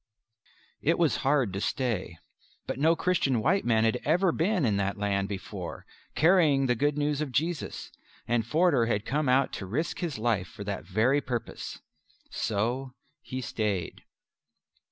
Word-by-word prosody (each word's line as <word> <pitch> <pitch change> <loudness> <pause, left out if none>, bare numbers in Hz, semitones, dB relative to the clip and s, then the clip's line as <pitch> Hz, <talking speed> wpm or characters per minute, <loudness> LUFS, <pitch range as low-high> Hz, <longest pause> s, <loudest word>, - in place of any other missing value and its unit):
It 165 +4 +2
was 165 -4 +2
hard 135 -7 +1
to 100 - -3
stay. 105 -11 -2 0.5
But - - -4
no 160 +3 +4
Christian 160 -9 +1
white 195 - +2
man 110 -2 +3
had 115 +2 +1
ever 175 +4 +3
been 180 0 +1
in 105 -4 +2
that 100 0 -1
land 100 -1 0
before 100 -2 -6 0.3
carrying 160 -5 +4
the 125 - +3
Good 145 +5 0
News 150 0 0
of 150 -3 -3
Jesus, 160 +3 -2 0.4
and 120 -1 +1
Forder 145 -1 +3
had 105 -2 0
come 145 0 0
out 130 +1 +3
to 95 - -5
risk 145 - -2
his 165 -8 -3
life 110 -5 0
for 100 - -9
that 100 -5 -4
very 115 +10 +2
purpose. 125 -3 -5 0.5
So 125 +5 -2 0.3
he 130 0 -5
stayed. 105 -8 -2
130 Hz, 155 wpm, -28 LUFS, 110-150 Hz, 0.5 s, no